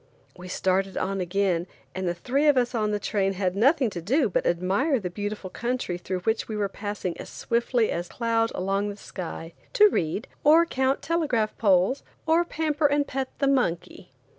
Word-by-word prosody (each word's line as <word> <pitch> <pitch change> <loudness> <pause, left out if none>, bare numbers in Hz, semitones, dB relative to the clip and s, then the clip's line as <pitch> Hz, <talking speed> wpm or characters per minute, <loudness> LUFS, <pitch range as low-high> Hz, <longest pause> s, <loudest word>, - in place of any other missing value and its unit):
We 180 0 -10
started 190 +1 0
on 195 0 -1
again, 180 -1 0 0.3
and 185 0 -3
the 175 - -1
three 270 - 0
of 290 -3 +5
us 245 0 +1
on 215 -3 0
the 210 - 0
train 195 -2 0
had 185 -1 -1
nothing 255 +2 +3
to 175 - -5
do 245 - +2
but - - 0
admire 195 - +1
the 180 -4 -5
beautiful 205 0 -5
country 240 -7 -3
through 185 +1 -4
which 220 +4 0
we 215 - -4
were 205 -1 0
passing 200 -3 -4
as - - -8
swiftly 235 0 0
as 175 +1 -3
cloud 230 +1 0
along 195 +2 -1
the 205 - -7
sky, 170 -4 -7 0.2
to 420 0 +7
read, 170 - -2 0.2
or 320 +3 +6
count 265 -3 0
telegraph 290 -10 0
poles, 195 +4 +3 0.2
or 325 +2 +4
pamper 310 -3 0
and 290 0 +1
pet 265 -1 -3
the 275 - +1
monkey. 180 -9 -1
210 Hz, 190 wpm, -26 LUFS, 185-265 Hz, 0.3 s, to